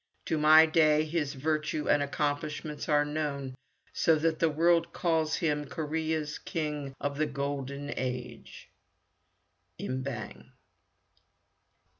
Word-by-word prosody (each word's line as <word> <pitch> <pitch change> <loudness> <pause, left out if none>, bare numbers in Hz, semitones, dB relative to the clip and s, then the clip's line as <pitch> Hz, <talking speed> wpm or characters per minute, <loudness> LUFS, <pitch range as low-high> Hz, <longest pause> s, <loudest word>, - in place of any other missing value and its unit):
To 160 - 0
my 155 +1 +8
day 155 -1 +4
his 150 -3 -2
virtue 150 +1 -1
and 145 - +4
accomplishments 145 +1 -3
are 145 -1 +4
known, 145 -3 -3 0.4
so 165 - +3
that 160 +1 0
the 165 - +3
world 165 +2 +2
calls 160 -3 +1
him 150 -3 0
Korea's 155 0 -2
King 150 -4 -4
of 145 0 -3
the 155 - +2
Golden 140 0 -4
Age. 125 -1 -6 1.1
Im 130 0 -3
Bang. 110 - -7
150 Hz, 115 wpm, -29 LUFS, 140-155 Hz, 1.1 s, my